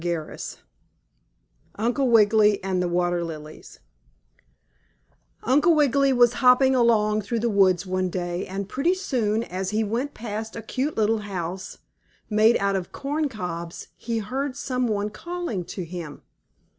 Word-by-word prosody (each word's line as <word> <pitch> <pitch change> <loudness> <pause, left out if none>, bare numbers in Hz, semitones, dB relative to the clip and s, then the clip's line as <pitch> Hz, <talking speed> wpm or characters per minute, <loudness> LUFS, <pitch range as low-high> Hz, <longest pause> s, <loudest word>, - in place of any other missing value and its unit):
STORY 170 -3 -3
XVI - - -7 1.2
UNCLE 245 +5 0
WIGGILY 210 -3 +4
AND 190 -1 0
THE 180 - 0
WATER 175 0 0
LILIES 155 -2 -9 1.6
Uncle 295 +7 +4
Wiggily 280 -2 +3
was 245 -2 +4
hopping 260 +1 +6
along 215 -4 +3
through 230 +3 -3
the 235 0 +1
woods 190 -2 +3
one 185 0 -1
day, 175 0 -3
and 195 +1 -4
pretty 305 - +1
soon, 230 - -1
as 190 -3 -4
he 215 +2 0
went 240 +7 -2
past 220 0 -5
a 225 - -6
cute 270 +6 -3
little 220 0 +2
house, 185 -2 -5 0.5
made 215 +2 +5
out 200 0 0
of 185 -2 -3
corncobs, 215 - -4
he 230 -1 -3
heard 260 +5 -3
some 255 -3 -1
one 210 -1 -1
calling 340 - -4
to 185 0 -6
him. 165 -4 -8
215 Hz, 145 wpm, -24 LUFS, 185-250 Hz, 1.6 s, hopping